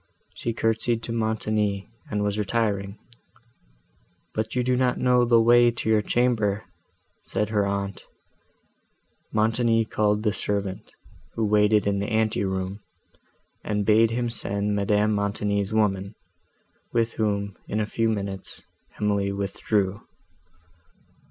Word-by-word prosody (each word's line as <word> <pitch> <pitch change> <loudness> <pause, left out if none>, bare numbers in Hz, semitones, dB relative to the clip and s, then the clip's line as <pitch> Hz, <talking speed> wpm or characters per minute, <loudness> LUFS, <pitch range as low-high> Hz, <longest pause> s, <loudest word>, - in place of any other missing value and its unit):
She 115 - -3
curtsied 115 0 0
to - - -4
Montoni, 110 -3 -1 0.2
and 105 -1 -1
was 105 +1 -1
retiring; 100 -2 -1 1.4
"But 110 +2 -3
you 125 - +1
do 125 +1 +1
not 125 -1 +1
know 125 -1 +3
the 120 -1 +5
way 120 +1 +6
to 115 -1 -3
your 110 -1 +4
chamber," 110 -3 +1 0.6
said 105 - -1
her 105 -2 +1
aunt. 100 -1 -3 1.3
Montoni 115 +1 +2
called 105 -1 0
the 105 -2 +1
servant, 100 -3 -3 0.4
who 115 - 0
waited 105 0 +3
in 100 -1 +1
the 100 - -2
ante 110 -2 +1
room, 95 +1 -3 0.8
and 105 -1 -1
bade 110 +1 +5
him 120 +1 -1
send 105 -2 -1
Madame 105 +1 +2
Montoni's 100 0 -1
woman, 100 -2 0 0.8
with 115 -1 +1
whom, 100 -2 -1
in 105 - -2
a 105 - +1
few 115 +1 0
minutes, 100 -3 -4 0.4
Emily 100 -1 +1
withdrew. 100 0 -1
105 Hz, 125 wpm, -25 LUFS, 100-115 Hz, 1.4 s, way